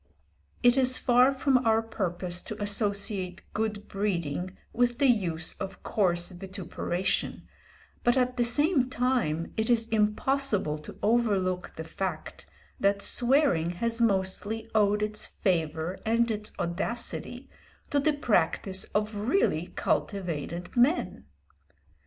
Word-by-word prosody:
It 245 Hz, +1 st, +5 dB
is 255 Hz, -1 st, +4 dB
far 250 Hz, +2 st, +4 dB
from 270 Hz, -1 st, +2 dB
our 225 Hz, -2 st, +2 dB
purpose 180 Hz, -5 st, -2 dB
to 215 Hz, -, -5 dB
associate 200 Hz, -3 st, 0 dB
good 210 Hz, -1 st, -2 dB
breeding 185 Hz, -3 st, -2 dB, 0.2 s
with 240 Hz, 0 st, +1 dB
the 280 Hz, -, +2 dB
use 180 Hz, -10 st, +1 dB
of 195 Hz, -1 st, -7 dB
coarse 175 Hz, -3 st, +1 dB
vituperation, 185 Hz, 0 st, -3 dB, 0.6 s
but 240 Hz, +2 st, +3 dB
at 250 Hz, 0 st, +1 dB
the 245 Hz, -, +2 dB
same 270 Hz, +2 st, +3 dB
time 240 Hz, -12 st, -1 dB
it 220 Hz, +1 st, 0 dB
is 230 Hz, -1 st, +3 dB
impossible 210 Hz, -, +1 dB
to 150 Hz, -, -11 dB
overlook 200 Hz, -5 st, +1 dB
the 160 Hz, -, -5 dB
fact 160 Hz, -, -5 dB, 0.3 s
that 200 Hz, 0 st, +2 dB
swearing 245 Hz, -, +3 dB
has 230 Hz, +5 st, -1 dB
mostly 205 Hz, +1 st, 0 dB
owed 210 Hz, -1 st, +3 dB
its 210 Hz, 0 st, -3 dB
favour 165 Hz, -1 st, -1 dB
and 230 Hz, +1 st, +2 dB
its 210 Hz, -1 st, -4 dB
audacity 235 Hz, +7 st, -3 dB, 0.4 s
to 285 Hz, -, +3 dB
the 300 Hz, +2 st, +2 dB
practice 195 Hz, -, +1 dB
of 210 Hz, +1 st, 0 dB
really 235 Hz, -, +1 dB
cultivated 175 Hz, -3 st, -3 dB
men. 255 Hz, +8 st, +1 dB
210 Hz, 120 wpm, -28 LUFS, 185-240 Hz, 0.6 s, It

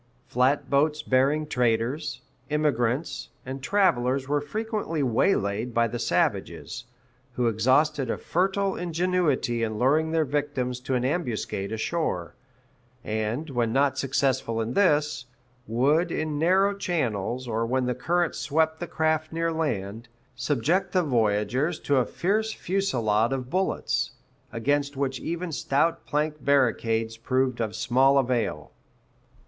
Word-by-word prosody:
Flatboats 140 Hz, +4 st, +1 dB
bearing 140 Hz, +4 st, +2 dB
traders, 125 Hz, +2 st, 0 dB, 0.3 s
immigrants, 145 Hz, -2 st, 0 dB, 0.2 s
and 130 Hz, +1 st, -6 dB
travelers 135 Hz, -7 st, +2 dB
were 145 Hz, +1 st, +1 dB
frequently 210 Hz, -1 st, -2 dB
waylaid 115 Hz, -, +1 dB
by 115 Hz, 0 st, +3 dB
the 120 Hz, +1 st, -5 dB
savages, 115 Hz, -, -1 dB, 0.5 s
who 125 Hz, 0 st, 0 dB
exhausted 130 Hz, +4 st, +2 dB
a -, -, -1 dB
fertile 195 Hz, +2 st, 0 dB
ingenuity 170 Hz, -8 st, 0 dB
in 110 Hz, -1 st, -1 dB
luring 150 Hz, +7 st, +2 dB
their 160 Hz, -1 st, +1 dB
victims 135 Hz, -3 st, -2 dB
to 130 Hz, +1 st, -2 dB
an 125 Hz, 0 st, 0 dB
ambuscade 120 Hz, -, -2 dB
ashore; 110 Hz, -, -2 dB, 0.7 s
and, 110 Hz, +8 st, -2 dB
when 120 Hz, -3 st, 0 dB
not 135 Hz, +2 st, +2 dB
successful 130 Hz, -4 st, 0 dB
in 115 Hz, +2 st, -2 dB
this, 150 Hz, -10 st, +2 dB, 0.4 s
would 145 Hz, +10 st, +2 dB
in 155 Hz, -2 st, -2 dB
narrow 190 Hz, +5 st, +3 dB
channels, 130 Hz, -, -2 dB
or 115 Hz, 0 st, -1 dB
when 130 Hz, +2 st, 0 dB
the 125 Hz, -, 0 dB
current 170 Hz, +7 st, 0 dB
swept 160 Hz, +1 st, 0 dB
the 175 Hz, -, -4 dB
craft 155 Hz, -1 st, 0 dB
near 165 Hz, 0 st, -1 dB
land, 115 Hz, -8 st, -3 dB, 0.3 s
subject 150 Hz, -, 0 dB
the 185 Hz, -1 st, +3 dB
voyagers 125 Hz, +4 st, +1 dB
to 140 Hz, -, +1 dB
a 125 Hz, -, +3 dB
fierce 215 Hz, +4 st, 0 dB
fusilade 120 Hz, -, 0 dB
of 130 Hz, -1 st, -3 dB
bullets, 190 Hz, +2 st, 0 dB, 0.4 s
against 140 Hz, +4 st, 0 dB
which 135 Hz, -2 st, -1 dB
even 170 Hz, +1 st, -4 dB
stout 145 Hz, +2 st, 0 dB
plank 150 Hz, 0 st, -1 dB
barricades 115 Hz, -4 st, +1 dB
proved 130 Hz, +1 st, 0 dB
of 110 Hz, -2 st, -2 dB
small 130 Hz, +4 st, +3 dB
avail. 120 Hz, -, 0 dB
135 Hz, 130 wpm, -26 LUFS, 120-160 Hz, 0.7 s, by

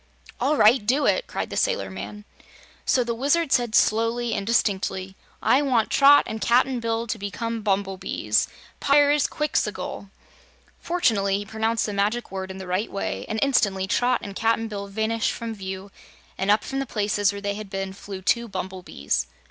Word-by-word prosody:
"All 285 Hz, +5 st, +1 dB
right; 220 Hz, +1 st, +5 dB
do 260 Hz, +7 st, +2 dB
it!" -, -, +2 dB
cried -, -, -4 dB
the -, -, -4 dB
sailor -, -, 0 dB
man. 210 Hz, 0 st, -8 dB, 0.6 s
So 250 Hz, -, +3 dB
the 235 Hz, 0 st, -2 dB
Wizard 280 Hz, +5 st, +1 dB
said 240 Hz, -3 st, +2 dB
slowly 230 Hz, +2 st, +2 dB
and 200 Hz, -, -3 dB
distinctly: 190 Hz, -4 st, 0 dB, 0.3 s
"I 270 Hz, -, +4 dB
want 250 Hz, -6 st, +1 dB
Trot 285 Hz, +1 st, +7 dB
and 220 Hz, 0 st, -5 dB
Cap'n 250 Hz, +1 st, +3 dB
Bill 230 Hz, 0 st, -1 dB
to 225 Hz, -1 st, -4 dB
become 230 Hz, +3 st, -4 dB
bumblebees 195 Hz, -2 st, 0 dB, 0.3 s
Pyrzqxgl!" 285 Hz, -7 st, +1 dB, 0.7 s
Fortunately, 205 Hz, -, +1 dB
he 205 Hz, -, -5 dB
pronounced 220 Hz, +2 st, -1 dB
the 210 Hz, -, -3 dB
Magic 210 Hz, +4 st, -1 dB
Word 190 Hz, -1 st, -5 dB
in 190 Hz, -, -7 dB
the 190 Hz, -, -7 dB
right 185 Hz, +4 st, -2 dB
way, 100 Hz, -, -3 dB
and 220 Hz, -, -2 dB
instantly 205 Hz, -9 st, +2 dB
Trot 245 Hz, +5 st, +1 dB
and 200 Hz, -1 st, -7 dB
Cap'n 225 Hz, +1 st, +1 dB
Bill 200 Hz, -2 st, -5 dB
vanished 220 Hz, +2 st, -1 dB
from 230 Hz, -1 st, -5 dB
view, 190 Hz, -1 st, -7 dB, 0.4 s
and 190 Hz, +1 st, -2 dB
up 210 Hz, +1 st, +4 dB
from 270 Hz, -, -3 dB
the 275 Hz, -, -3 dB
places 205 Hz, -2 st, +1 dB
where 200 Hz, -, -6 dB
they 200 Hz, 0 st, -2 dB
had 210 Hz, -1 st, -7 dB
been 195 Hz, -1 st, -4 dB
flew 195 Hz, -1 st, -8 dB
two 235 Hz, +4 st, +1 dB
bumblebees. 180 Hz, -, -3 dB
220 Hz, 170 wpm, -24 LUFS, 195-240 Hz, 0.7 s, Trot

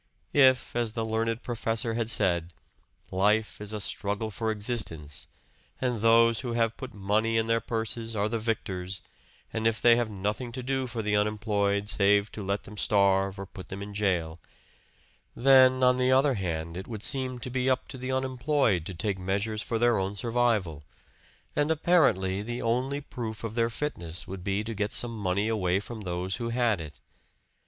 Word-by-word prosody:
If, 130 Hz, -4 st, +4 dB
as 120 Hz, -2 st, 0 dB
the 115 Hz, -1 st, -2 dB
learned 115 Hz, +1 st, -1 dB
professor 115 Hz, -1 st, -1 dB
had 115 Hz, -1 st, -1 dB
said, 85 Hz, -6 st, +1 dB, 0.6 s
life 105 Hz, +3 st, +1 dB
is 105 Hz, 0 st, -5 dB
a 105 Hz, -, -3 dB
struggle 105 Hz, +2 st, -2 dB
for 110 Hz, +2 st, -2 dB
existence, 100 Hz, -9 st, -3 dB, 0.5 s
and 125 Hz, -4 st, -1 dB
those 115 Hz, 0 st, +5 dB
who 120 Hz, -3 st, -3 dB
have 115 Hz, -1 st, +1 dB
put 130 Hz, -1 st, -7 dB
money 105 Hz, +3 st, +1 dB
in 110 Hz, -, +2 dB
their 115 Hz, 0 st, +1 dB
purses 115 Hz, 0 st, -2 dB
are 105 Hz, 0 st, +1 dB
the 115 Hz, +1 st, -2 dB
victors; 95 Hz, -5 st, -3 dB, 0.5 s
and 110 Hz, 0 st, +1 dB
if 110 Hz, -1 st, 0 dB
they 120 Hz, +1 st, +6 dB
have 120 Hz, -2 st, 0 dB
nothing 105 Hz, +4 st, -3 dB
to 130 Hz, +1 st, -5 dB
do 130 Hz, 0 st, -1 dB
for 115 Hz, -2 st, -4 dB
the 105 Hz, 0 st, +1 dB
unemployed 105 Hz, -1 st, +1 dB
save 100 Hz, +1 st, +3 dB
to 110 Hz, -, -7 dB
let 100 Hz, +1 st, -2 dB
them 105 Hz, -, -11 dB
starve 100 Hz, -1 st, +2 dB
or 100 Hz, -, -5 dB
put 95 Hz, -1 st, -11 dB
them 100 Hz, +1 st, -5 dB
in 100 Hz, 0 st, -8 dB
jail; 90 Hz, -5 st, 0 dB, 1.0 s
then 130 Hz, 0 st, +6 dB
on 125 Hz, 0 st, +5 dB
the 130 Hz, 0 st, +2 dB
other 135 Hz, +2 st, +4 dB
hand, 85 Hz, -5 st, -3 dB
it 95 Hz, +1 st, -6 dB
would 110 Hz, -3 st, -6 dB
seem 130 Hz, -2 st, 0 dB
to 125 Hz, +1 st, -4 dB
be 130 Hz, +1 st, +1 dB
up 130 Hz, -, 0 dB
to -, -, -6 dB
the 130 Hz, +1 st, -3 dB
unemployed 130 Hz, -, +1 dB
to 95 Hz, -, -6 dB
take 95 Hz, +2 st, -1 dB
measures 100 Hz, +4 st, -1 dB
for 115 Hz, -, -2 dB
their 120 Hz, -2 st, +3 dB
own 95 Hz, +1 st, -2 dB
survival. 110 Hz, -9 st, 0 dB, 0.7 s
And 145 Hz, +1 st, +2 dB
apparently 135 Hz, -, +3 dB
the 120 Hz, +3 st, -4 dB
only 130 Hz, +5 st, 0 dB
proof 115 Hz, -6 st, -6 dB
of 115 Hz, -2 st, -4 dB
their 115 Hz, 0 st, +1 dB
fitness 90 Hz, -, -4 dB
would 95 Hz, -1 st, -7 dB
be 100 Hz, +2 st, -1 dB
to 115 Hz, +1 st, -4 dB
get 105 Hz, 0 st, -1 dB
some 120 Hz, -1 st, 0 dB
money 100 Hz, 0 st, 0 dB
away 95 Hz, -4 st, +1 dB
from 110 Hz, +2 st, -7 dB
those 90 Hz, 0 st, -2 dB
who 120 Hz, -1 st, -3 dB
had 115 Hz, -5 st, +1 dB
it. 75 Hz, -2 st, -10 dB
110 Hz, 185 wpm, -28 LUFS, 100-120 Hz, 1.0 s, they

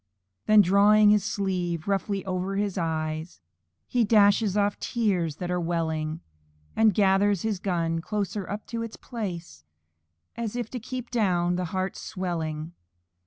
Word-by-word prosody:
Then 215 Hz, -1 st, +7 dB
drawing 205 Hz, +3 st, +5 dB
his 210 Hz, -2 st, +3 dB
sleeve 180 Hz, -5 st, -2 dB
roughly 200 Hz, 0 st, -1 dB
over 185 Hz, +1 st, -2 dB
his 200 Hz, -1 st, -1 dB
eyes, 160 Hz, -1 st, -3 dB, 0.5 s
He 245 Hz, -2 st, +1 dB
dashes 205 Hz, -1 st, +4 dB
off 205 Hz, 0 st, +1 dB
tears 185 Hz, -10 st, 0 dB
that 180 Hz, +2 st, -4 dB
are 180 Hz, -, 0 dB
welling; 160 Hz, -2 st, -2 dB, 0.5 s
And 220 Hz, -3 st, +4 dB
gathers 200 Hz, -1 st, +3 dB
his 215 Hz, -4 st, -1 dB
gun 165 Hz, -3 st, -1 dB
closer 205 Hz, 0 st, -3 dB
up 205 Hz, +1 st, -5 dB
to 230 Hz, -, -1 dB
his 230 Hz, -1 st, -5 dB
breast, 175 Hz, -, -6 dB, 0.7 s
As 235 Hz, -1 st, -4 dB
if 240 Hz, -3 st, -4 dB
to 250 Hz, -, -4 dB
keep 250 Hz, +1 st, -6 dB
down 180 Hz, -7 st, +1 dB
the 180 Hz, 0 st, -1 dB
heart's 185 Hz, +2 st, -3 dB
swelling. 165 Hz, -3 st, -4 dB
195 Hz, 145 wpm, -26 LUFS, 170-210 Hz, 0.7 s, Then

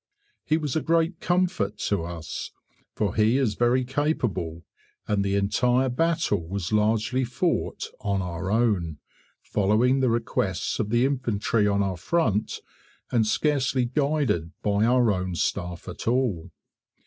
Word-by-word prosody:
He 155 Hz, -, +1 dB
was 150 Hz, -5 st, -3 dB
a 160 Hz, -, +1 dB
great 165 Hz, +2 st, +1 dB
comfort 175 Hz, -, 0 dB
to 100 Hz, -5 st, -1 dB
us, 85 Hz, -2 st, -6 dB, 0.5 s
for 105 Hz, -3 st, 0 dB
he 110 Hz, +3 st, +3 dB
is 130 Hz, -6 st, +1 dB
very 120 Hz, +4 st, +2 dB
capable, 120 Hz, -, -1 dB, 0.4 s
and 105 Hz, -2 st, +1 dB
the 100 Hz, 0 st, 0 dB
entire 125 Hz, +6 st, +2 dB
battle 125 Hz, -, +1 dB
was 95 Hz, +1 st, -3 dB
largely 110 Hz, +4 st, +2 dB
fought 130 Hz, +8 st, -1 dB
"on 100 Hz, -2 st, -1 dB
our 90 Hz, 0 st, -4 dB
own", 100 Hz, -8 st, +1 dB, 0.5 s
following 110 Hz, +6 st, +2 dB
the 130 Hz, -2 st, +2 dB
requests 115 Hz, -3 st, -1 dB
of 110 Hz, -3 st, -1 dB
the 120 Hz, +3 st, +3 dB
Infantry 115 Hz, -5 st, 0 dB
on 100 Hz, 0 st, +2 dB
our 95 Hz, -2 st, -2 dB
front, 110 Hz, -, 0 dB, 0.5 s
and 115 Hz, -3 st, +2 dB
scarcely 135 Hz, 0 st, +1 dB
guided 140 Hz, -, 0 dB
by 105 Hz, +1 st, +2 dB
our 120 Hz, -2 st, +4 dB
own 90 Hz, -2 st, -2 dB
staff 85 Hz, +1 st, -2 dB
at -, -, -7 dB
all. 115 Hz, -9 st, 0 dB
115 Hz, 140 wpm, -25 LUFS, 100-130 Hz, 0.5 s, our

